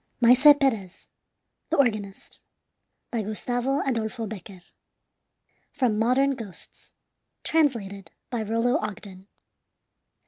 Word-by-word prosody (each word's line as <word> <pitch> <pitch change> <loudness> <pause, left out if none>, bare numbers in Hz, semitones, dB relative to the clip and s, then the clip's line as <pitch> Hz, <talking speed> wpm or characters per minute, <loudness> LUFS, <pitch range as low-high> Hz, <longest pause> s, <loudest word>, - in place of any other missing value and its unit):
MAESE 255 +5 +7
PEREZ, 220 -10 -1 0.6
THE 330 - 0
ORGANIST 215 -7 -1 0.7
By 235 - -1
Gustavo 245 +6 -2
Adolfo 230 -2 -2
Becquer 195 -3 -9 1.1
From 230 -6 0
"Modern 255 +5 +3
Ghosts." 225 -9 -7 0.5
Translated 230 - 0 0.2
by 240 -3 -2
Rollo 230 +3 +1
Ogden. 200 -2 -7
230 Hz, 90 wpm, -25 LUFS, 205-255 Hz, 1.1 s, MAESE